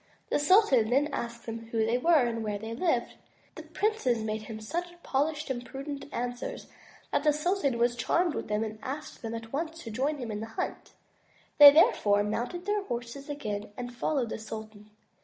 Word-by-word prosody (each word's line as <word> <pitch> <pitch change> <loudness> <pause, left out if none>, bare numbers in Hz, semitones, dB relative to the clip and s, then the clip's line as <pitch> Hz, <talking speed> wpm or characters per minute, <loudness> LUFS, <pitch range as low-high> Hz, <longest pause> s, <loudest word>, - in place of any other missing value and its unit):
The - - +3
sultan 290 - +5
then 280 +4 +3
asked 235 0 -4
them 230 0 -6
who 225 -1 0
they 235 +2 +1
were 320 -1 +5
and 230 -1 -2
where 210 -1 -2
they 220 +2 -6
lived. 250 -2 0 0.4
The - - -8
princes 320 - 0
made 215 0 -2
him 215 0 -7
such 335 +12 -3 0.2
polished 295 +1 -1
and 245 -2 -3
prudent 275 +2 -6
answers 245 - -4 0.5
that - - +2
the 305 - +5
sultan 300 -4 0
was 240 +1 +2
charmed 340 +7 +1
with - - -4
them 210 +1 0
and 215 -1 -6
asked 280 +3 -6
them 230 0 -4
at 225 +1 -8
once 325 +3 -3
to 225 - -7
join 275 +7 0
him 240 -5 -5
in 210 - -3
the 220 - -5
hunt. - - -4 0.7
They 290 -1 +13
therefore 205 -9 +4
mounted 245 - -3
their 415 +1 +1
horses 245 +3 -5
again 210 -9 -4
and 245 -1 -5
followed 250 -1 -1
the - - -4
sultan. 215 -1 -8
245 Hz, 195 wpm, -29 LUFS, 225-300 Hz, 0.7 s, They